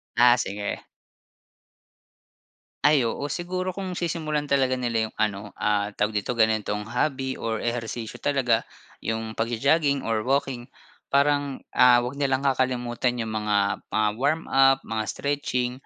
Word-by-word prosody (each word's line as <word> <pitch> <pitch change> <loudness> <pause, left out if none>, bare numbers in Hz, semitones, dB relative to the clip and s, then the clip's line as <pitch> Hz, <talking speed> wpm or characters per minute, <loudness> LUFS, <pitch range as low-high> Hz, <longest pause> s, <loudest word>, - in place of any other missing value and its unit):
Ah, 120 +1 +6
sige. 100 -2 -3 2.0
Ay 150 0 +5
oo, 145 +5 -3
siguro 185 +2 -3
kung 185 -1 -5
sisimulan 155 -3 -2
talaga 135 -3 +2
nila 115 -3 0
yung - - -18
ano 105 -1 -2
ah 105 0 0
tawag 105 0 0
dito 120 +5 -4
ganitong 110 -2 +1
hobby 130 +3 -2
or 110 -1 -2
ehersisyo 115 -1 -4
talaga 125 -5 +1 0.3
yung 110 0 -3
pagjo-jogging 140 +5 +2
or 115 -1 0
walking. 135 -3 0 0.5
Parang, 145 -1 +2
ah, 125 -1 +6
huwag 125 +3 -5
nilang 135 -1 +1
kakalimutan 125 -2 0
yung 110 - -5
mga 105 -2 0
mga 110 0 +1
warm-up, 135 -2 +3
mga 110 -1 -2
stretching 140 -3 -1
125 Hz, 130 wpm, -25 LUFS, 110-140 Hz, 2.0 s, Ah